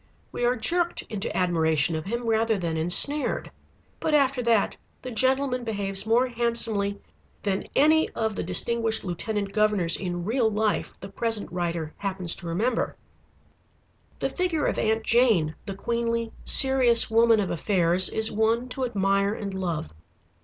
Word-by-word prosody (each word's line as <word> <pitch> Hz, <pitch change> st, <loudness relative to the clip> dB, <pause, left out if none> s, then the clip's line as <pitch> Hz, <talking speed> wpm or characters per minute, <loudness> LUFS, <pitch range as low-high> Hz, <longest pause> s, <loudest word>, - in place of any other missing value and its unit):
We -, -, -4 dB
are 245 Hz, +1 st, +2 dB
jerked 345 Hz, +8 st, 0 dB
into 205 Hz, -3 st, -3 dB
admiration 160 Hz, -3 st, +1 dB
of 155 Hz, +1 st, -4 dB
him, 235 Hz, +4 st, -4 dB
rather 225 Hz, -1 st, +1 dB
than 170 Hz, -3 st, -3 dB
ensnared. 175 Hz, -, +2 dB, 0.5 s
But 310 Hz, -, 0 dB
after 275 Hz, -3 st, +2 dB
that 230 Hz, -3 st, +1 dB, 0.3 s
the 255 Hz, -, -6 dB
gentleman 260 Hz, +2 st, +1 dB
behaves 200 Hz, -2 st, -2 dB
more 235 Hz, +3 st, +3 dB
handsomely 230 Hz, -4 st, -1 dB, 0.4 s
than 195 Hz, -2 st, -2 dB
any 315 Hz, +3 st, +4 dB
of 220 Hz, -2 st, -2 dB
the -, -, -3 dB
distinguished 225 Hz, +5 st, +1 dB
lieutenant 200 Hz, +3 st, -4 dB
governors 210 Hz, -6 st, +2 dB
in 175 Hz, -2 st, -4 dB
real 230 Hz, +1 st, +1 dB
life 215 Hz, 0 st, -2 dB
the 195 Hz, -, -8 dB
present 225 Hz, +1 st, -2 dB
writer 170 Hz, -3 st, -3 dB
happens 185 Hz, -4 st, -4 dB
to 175 Hz, -, -8 dB
remember. 220 Hz, +9 st, -1 dB, 1.2 s
The -, -, -2 dB
figure 355 Hz, -5 st, -1 dB
of -, -, -1 dB
Aunt 220 Hz, 0 st, 0 dB
Jane, 220 Hz, -11 st, +2 dB
the 195 Hz, -, -5 dB
queenly 230 Hz, +1 st, -2 dB
serious 255 Hz, -4 st, +5 dB
woman 230 Hz, 0 st, +4 dB
of 195 Hz, -, -1 dB
affairs, 180 Hz, 0 st, +2 dB
is 220 Hz, 0 st, +2 dB
one 225 Hz, +3 st, 0 dB
to 260 Hz, +1 st, -2 dB
admire 200 Hz, -2 st, 0 dB
and 200 Hz, -3 st, -6 dB
love. 170 Hz, -, -4 dB
220 Hz, 150 wpm, -25 LUFS, 190-235 Hz, 1.2 s, serious